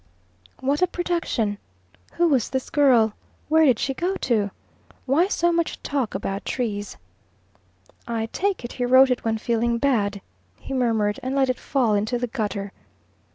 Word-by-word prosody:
What 280 +4 0
a 365 - +4
production! 335 - -1 0.5
Who 345 - +2
was 265 -8 +2
this 260 -1 -3
girl? 250 -7 +4 0.4
Where 320 0 +5
did 255 -6 +4
she 270 - -1
go 355 +8 -1
to? 220 - 0 0.6
Why 290 +8 +3
so 345 -3 +1
much 335 -1 -1
talk 270 -8 -2
about 195 0 -3
trees? 210 -5 -3 1.1
"I 230 -1 -1
take 390 -9 -1
it 240 - -7
he 250 - -2
wrote 260 +1 +6
it 250 - -1
when 225 -1 0
feeling 235 +1 0
bad," 215 -6 +1 0.4
he - - -8
murmured, 225 -4 +1
and 260 +2 -3
let 265 -2 +3
it 255 - -7
fall 250 -6 +1
into 215 +4 0
the 245 - -1
gutter. 205 -5 -3
250 Hz, 160 wpm, -23 LUFS, 220-280 Hz, 1.1 s, wrote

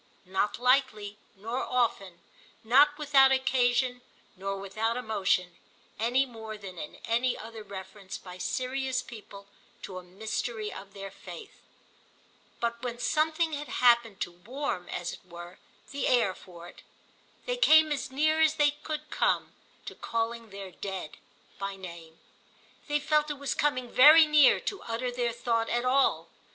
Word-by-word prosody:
Not 190 +3 -1
lightly 245 -5 +1 0.2
nor 225 +6 -4
often, 200 -8 -1 0.4
not 285 +6 +5
without 275 -3 +5
occasion 250 -1 +2 0.3
nor 195 +1 -4
without 215 +4 -2
emotion, 195 -6 0 0.4
any 245 +4 +2
more 220 -3 -8
than 190 -4 -9
in 150 - -7
any 240 +2 +1
other 225 0 -9
reference 190 -1 -8
by 180 -1 -11
serious 260 +3 -2
people 205 -5 -11 0.4
to 185 -2 -6
a - - -13
mystery 215 +3 -4
of 195 +1 -11
their 195 -1 -7
faith; 180 -3 -11 1.0
but 235 0 -2
when 240 -1 -4
something 315 +4 +1
had 295 0 -4
happened 235 -4 +3
to - - -2
warm, 195 +1 -5
as 175 -1 -4
it - - -12
were, 175 0 -11 0.3
the 280 0 -2
air 235 -7 +3
for 175 -2 -13
it, - - -14 0.6
they - - -1
came 315 -11 +6
as 290 - -2
near 310 +4 +2
as 315 -1 +4
they 295 -1 +4
could 305 +1 -6
come - - +1 0.3
to - - -6
calling 230 0 -3
their 195 -1 -8
Dead 185 -3 -6 0.4
by 195 0 -4
name. 170 -4 -11 0.7
They 295 -1 +1
felt 300 +1 +1
it 295 - -2
was 280 0 -2
coming 255 -4 0
very 305 +7 +8
near 300 -2 +6
to 395 - -4
utter 235 +2 -3
their 240 -1 -1
thought 230 -1 -1
at 240 +1 0
all. 255 -11 +2
235 Hz, 150 wpm, -29 LUFS, 195-270 Hz, 1.0 s, very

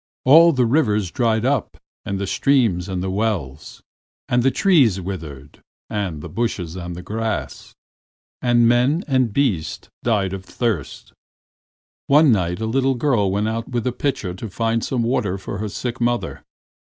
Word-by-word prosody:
All 165 +6 +8
the 130 -5 +2
rivers 105 - +1
dried 115 -2 +1
up 130 -7 -1 0.3
and 100 - -2
the 100 - -2
streams 110 -7 +1
and 95 -1 -3
wells, 95 -11 -3 0.4
and 125 0 +2
the 135 - +3
trees 135 - +3
withered 80 -7 -8 0.3
and 95 -8 -3
the - - -6
bushes 95 -8 -3
and 90 0 -7
grass, 110 +1 -4 0.7
and 120 -1 +4
men 125 +9 +2
and 130 -5 +1
beasts 100 - -1
died 100 -5 0
of 95 -1 -6
thirst. 110 - -3 0.9
One 145 0 +6
night 90 -4 0
a 110 - -2
little 135 +3 +1
girl 120 -6 +1
went 100 +3 0
out 115 +1 -3
with 120 -3 -2
a 125 - +1
pitcher 120 -8 -2
to 105 +4 -7
find 115 +3 -1
some 125 -3 -1
water 115 -5 0
for 95 0 -6
her 105 0 -3
sick 120 +4 -5
mother. 120 0 -1
115 Hz, 155 wpm, -21 LUFS, 95-125 Hz, 0.9 s, All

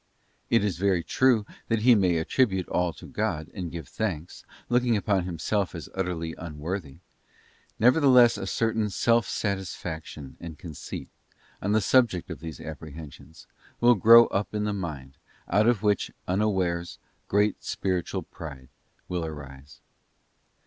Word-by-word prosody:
It 115 -2 +3
is 95 -5 -1
very 95 -3 +2
true 120 +4 +3 0.2
that 115 -2 0
he 125 0 +7
may 90 -6 +3
attribute 95 +2 +1
all 90 -1 +1
to - - -12
God 80 -1 -3
and 90 -3 -5
give 80 -6 -7
thanks, 90 -7 -4 0.2
looking 120 -2 +2
upon 100 -3 0
himself 90 +3 -1
as 80 -5 -7
utterly 90 -3 -3
unworthy; 80 -1 -5 0.8
nevertheless 125 -1 +6
a 95 - -5
certain 110 +2 0
secret - - -9
self 115 -1 +3
satis 100 -3 -2
faction 80 -4 -7
and 85 -3 -8
conceit, 80 -1 -7 0.5
on 100 +2 0
the 110 - +3
subject 115 -6 +2
of - - -6
these 80 -1 -8
Apprehensions, 80 0 -10 0.3
will 120 +1 +6
grow 115 +2 +8
up 100 +2 -2
in 105 - 0
the 105 0 -1
mind, 75 -9 -6 0.3
out 105 +5 +3
of 115 -4 +2
which, 105 -2 +1 0.2
unawares, 90 -3 0 0.3
great 105 0 +1
spiritual 90 -3 -2
pride 70 -6 -10 0.4
will 90 -2 -2
arise.. 70 -3 -9
95 Hz, 145 wpm, -27 LUFS, 80-110 Hz, 0.8 s, grow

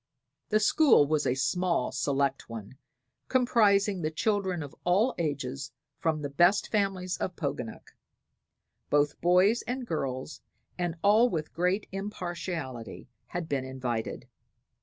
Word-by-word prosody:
The 215 - +3
school 235 - +5
was 150 0 +1
a 125 - +2
small, 170 +7 0
select 140 -2 -1
one, 115 +3 -8 0.5
comprising 210 -6 +3
the 155 - 0
children 190 0 0
of 140 - -9
all 200 +9 +3
ages 140 -3 -3 0.3
from 160 -2 0
the 145 - -2
best 175 +7 +3
families 195 -3 0
of 180 - -3
Poganuc. 140 -7 -5 1.0
Both 145 0 +1
boys 185 +6 +4
and 250 +1 -3
girls, 135 - -4 0.3
and 175 -2 -2
all 215 +4 +5
with 155 -6 -3
great 180 +4 0
impartiality, 175 - -5 0.2
had 175 -2 -4
been 140 -4 -1
invited. 125 -4 -4
170 Hz, 125 wpm, -29 LUFS, 140-200 Hz, 1.0 s, school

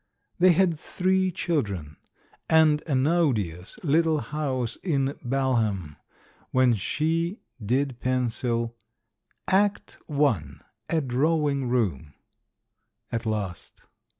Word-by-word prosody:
They 180 0 +6
had 170 -3 +2
three 185 +2 +1
children, 100 - -2 0.5
and 155 -2 +5
an 135 -3 +2
odious 110 - 0
little 160 +1 +3
house 130 -2 -2
in 140 -6 0
Balham 115 - 0 0.5
when 130 -2 +4
she 165 - -1 0.2
did 130 +3 0
pencil 120 -2 -1 0.7
"Act 200 +2 +1
I. 140 - +2 0.2
— 110 +1 -43
A 165 -1 +1
Drawing 140 0 +1
Room" 90 - -1 1.0
at 115 -1 -2
last. 105 -5 -4
135 Hz, 95 wpm, -26 LUFS, 115-160 Hz, 1.0 s, They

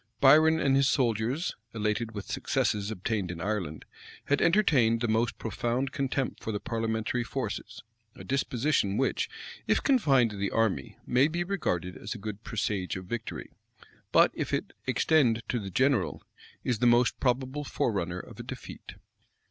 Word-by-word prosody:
Biron 155 +4 +6
and 135 -3 +3
his 135 0 +4
soldiers, 125 - 0 0.2
elated 110 +1 -1
with 100 -2 -6
successes 105 -1 -1
obtained 105 -2 -2
in 85 -1 -5
Ireland, 90 -6 -3 0.4
had 145 - +1
entertained 145 - +4
the 120 - 0
most 115 0 +1
profound 120 +4 -2
contempt 135 -2 -2
for 110 - -3
the 105 - -2
parliamentary 115 +2 -1
forces; 115 -2 -5 0.3
a - - -10
disposition 130 -5 0
which, 135 - 0 0.4
if - - +2
confined 140 - +4
to 105 - -7
the 100 0 -1
army, 115 -3 0
may 130 +3 +4
be 170 +2 -1
regarded 90 - -2
as 100 - -6
a - - -5
good 105 +1 -7
presage 100 -4 -2
of 95 0 -6
victory; 115 +4 -5 0.6
but - - +6
if - - -1
it - - -4
extend 120 -8 +3
to 120 - 0
the 100 -2 -6
general, 130 +1 +1 0.4
is 120 -4 0
the 125 - +4
most 120 0 +3
probable 130 +3 0
forerunner 95 - -1
of - - -11
a - - -5
defeat. - - -9
115 Hz, 160 wpm, -29 LUFS, 105-135 Hz, 0.6 s, Biron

